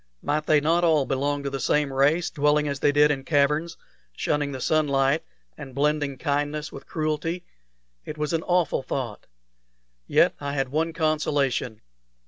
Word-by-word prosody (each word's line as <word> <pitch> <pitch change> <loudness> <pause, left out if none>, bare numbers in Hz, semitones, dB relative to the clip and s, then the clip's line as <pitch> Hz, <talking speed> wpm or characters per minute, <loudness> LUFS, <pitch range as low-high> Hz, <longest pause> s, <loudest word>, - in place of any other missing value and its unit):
Might 150 +1 -1
they 155 - +5
not 165 +4 +2
all 155 -5 +3
belong 140 +2 -1
to 140 - -3
the 135 - -3
same 145 +1 +1
race, 150 +6 +2
dwelling 150 0 +2
as 140 -1 -3
they 145 - +3
did 150 +1 +4
in 135 -2 -2
caverns, 150 +3 +1 0.4
shunning 145 -1 0
the 130 - -5
sunlight, 140 0 +1 0.3
and 130 - -10
blending 145 -1 0
kindness 145 +1 -2
with 135 - -11
cruelty? 160 +3 -2 0.6
It 155 - -7
was 150 +2 -2
an 165 - +1
awful 175 -6 +1
thought! 125 -5 -5 0.8
Yet - - +4
I 140 0 -4
had 135 -2 -1
one 160 +4 0
consolation. 145 -7 0
145 Hz, 160 wpm, -25 LUFS, 140-155 Hz, 0.8 s, they